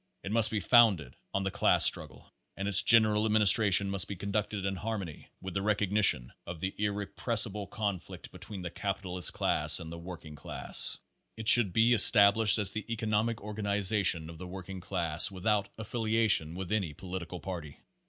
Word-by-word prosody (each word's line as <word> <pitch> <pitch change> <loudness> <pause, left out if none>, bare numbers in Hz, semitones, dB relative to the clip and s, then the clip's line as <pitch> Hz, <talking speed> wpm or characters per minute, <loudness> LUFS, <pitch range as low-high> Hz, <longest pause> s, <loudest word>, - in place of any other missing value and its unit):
It 95 - -7
must 110 -1 +1
be 110 - -3
founded 100 - +2 0.2
on 95 - -3
the 95 - -4
class - - +2
struggle, - - -1 0.2
and 100 +1 -5
its 100 0 +6
general 110 -2 +3
administration 105 -2 +3
must 100 -2 +1
be 100 - -7
conducted 100 +1 -5
in 95 -1 -4
harmony 105 -5 -6
Pace - - -16
Thirty - - -22
nine - - -40
with 95 -1 -8
the 95 - -3
recognition 100 - 0
of 85 -1 -8
the 95 +3 -5
irrepressible 105 0 -1
conflict 100 -2 -7
be - - -14
tween 100 -3 -6
the 90 -1 -7
capitalist 95 -2 -1
class - - +2
and 80 -1 -10
the 85 - -9
working 85 -3 -11
class. - - +1 0.4
It 110 -1 -9
should 115 -6 +7
be 115 +6 +2
established 105 -2 +5
as 105 -2 0
the 110 +1 -7
economic 110 0 -2
organiza 105 -1 -2
tion 80 -3 +1
of 80 - -14
the 90 - -9
working 95 0 -10
class, 85 -3 +1
without 100 +1 -3
affiliation 110 -6 -1
with 95 +1 -8
any 95 -9 -3
political 90 0 -8
party. 80 -4 -9
100 Hz, 185 wpm, -28 LUFS, 90-110 Hz, 0.4 s, should